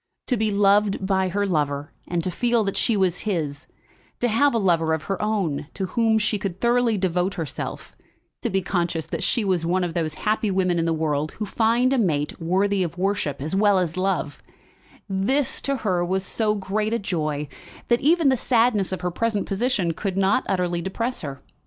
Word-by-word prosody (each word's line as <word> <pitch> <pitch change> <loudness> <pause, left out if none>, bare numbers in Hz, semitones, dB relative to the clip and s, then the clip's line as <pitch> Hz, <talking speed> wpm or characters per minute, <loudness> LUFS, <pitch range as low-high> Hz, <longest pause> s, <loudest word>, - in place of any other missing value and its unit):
To 250 - +1
be 220 -1 +1
loved 200 -1 +3
by 190 -1 +1
her 200 +3 0
lover, 145 -4 -1 0.2
and 175 -1 -1
to 185 - -2
feel 235 +3 +1
that 195 -1 -2
she 230 -4 +2
was 185 -3 +1
his, 155 -8 -3 0.5
to 245 - +1
have 235 +4 +3
a - - +4
lover 165 -6 +2
of 155 - -7
her 195 - -3
own 195 -10 -1
to 195 - -2
whom 225 -1 +3
she 215 -1 0
could 190 -2 -4
thoroughly 235 -2 +2
devote 180 0 0
herself, 160 -5 -5 0.5
to - - -1
be 190 0 0
conscious 170 -3 -1
that - - -4
she 210 +4 +1
was 185 -4 +1
one 180 +2 +1
of 175 -2 -2
those 160 -2 -2
happy 215 +3 0
women 185 -2 +1
in 165 - +1
the 165 - +1
world 155 -2 -1
who 215 - -4
find 235 +5 +2
a 265 - +2
mate 155 -7 0
worthy 190 +4 +1
of 175 -1 -2
worship 185 -7 -1
as 155 +5 -2
well 205 0 +4
as 175 -3 0
love, 185 -6 -1 0.7
this 240 +8 0
to 275 - -1
her 180 -3 +2
was 190 +2 -1
so 215 +2 0
great 210 +2 -1
a - - +2
joy 155 -7 -2 0.4
that 240 0 +2
even 320 0 +4
the 260 - +4
sadness 230 -5 +2
of 185 - -3
her 180 0 -1
present 220 +1 -1
position 200 -4 0
could 190 +2 -3
not 195 +5 +3
utterly 175 -2 0
depress 230 +7 -3
her. 140 -4 -7
190 Hz, 200 wpm, -24 LUFS, 170-215 Hz, 0.7 s, a